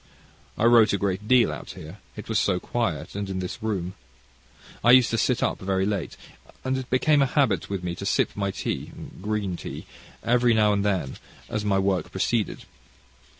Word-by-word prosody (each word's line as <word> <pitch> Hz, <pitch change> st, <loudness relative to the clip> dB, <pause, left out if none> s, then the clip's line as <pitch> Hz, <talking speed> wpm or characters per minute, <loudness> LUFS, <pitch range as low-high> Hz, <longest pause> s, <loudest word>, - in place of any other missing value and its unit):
I -, -, -1 dB
wrote 115 Hz, -3 st, +6 dB
a -, -, +2 dB
great 100 Hz, +1 st, -2 dB
deal 125 Hz, -2 st, +5 dB
out -, -, -8 dB
here, 80 Hz, +6 st, -10 dB, 0.2 s
it 105 Hz, -, -8 dB
was 110 Hz, -, +1 dB
so 90 Hz, -3 st, +1 dB
quiet, 85 Hz, -9 st, -2 dB
and 100 Hz, -1 st, -4 dB
in 95 Hz, -, -3 dB
this 95 Hz, +5 st, -5 dB
room. 95 Hz, -5 st, -2 dB, 0.9 s
I 120 Hz, -, +4 dB
used 125 Hz, -2 st, +1 dB
to 115 Hz, -, +1 dB
sit 125 Hz, +2 st, +1 dB
up -, -, 0 dB
very 95 Hz, 0 st, 0 dB
late, 100 Hz, -6 st, -3 dB, 0.5 s
and 130 Hz, 0 st, 0 dB
it 130 Hz, -1 st, -5 dB
became 145 Hz, +3 st, +3 dB
a 135 Hz, -, +3 dB
habit 125 Hz, -8 st, +1 dB
with 100 Hz, -2 st, -3 dB
me 90 Hz, -1 st, -2 dB
to 100 Hz, -, -6 dB
sip -, -, +2 dB
my 100 Hz, -1 st, -1 dB
tea 95 Hz, -, -4 dB, 0.3 s
green 105 Hz, -2 st, -2 dB
tea -, -, -7 dB, 0.4 s
every 120 Hz, 0 st, +3 dB
now 105 Hz, -1 st, +4 dB
and 100 Hz, -1 st, 0 dB
then 95 Hz, -10 st, -1 dB, 0.3 s
as 110 Hz, -1 st, -2 dB
my 100 Hz, -2 st, +1 dB
work 95 Hz, -3 st, 0 dB
proceeded. 115 Hz, -4 st, -1 dB
105 Hz, 195 wpm, -25 LUFS, 95-115 Hz, 0.9 s, wrote